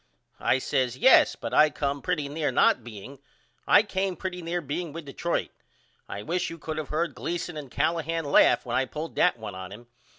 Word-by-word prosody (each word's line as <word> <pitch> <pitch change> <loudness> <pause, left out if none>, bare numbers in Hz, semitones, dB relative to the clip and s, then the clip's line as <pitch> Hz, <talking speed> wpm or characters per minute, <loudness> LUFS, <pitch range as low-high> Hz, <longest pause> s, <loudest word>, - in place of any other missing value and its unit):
I - - +2
says 130 -1 -1
Yes - - +6
but - - -6
I 155 - +6
come 140 -1 -3
pretty 160 -6 -1
near 145 0 -2
not 125 -1 +3
being. 120 +4 -10 0.5
I 205 - +6
came 195 -3 -2
pretty 180 -1 -5
near 170 +1 -2
being 160 +1 -4
with 165 -1 -7
Detroit. 160 +5 -2 0.6
I 100 - -6
wish 175 +6 -1
you 165 - -8
could 155 0 -5
of 155 - -6
heard 165 +3 -1
Gleason 175 0 -4
and 145 -3 -7
Callahan 165 +3 -1
laugh 140 - +4
when 120 - -3
I 135 - +2
pulled 155 +5 -7
that 180 - +3
one 110 -3 -7
on 95 0 -8
him. 115 +4 -11
150 Hz, 200 wpm, -26 LUFS, 130-170 Hz, 0.6 s, Yes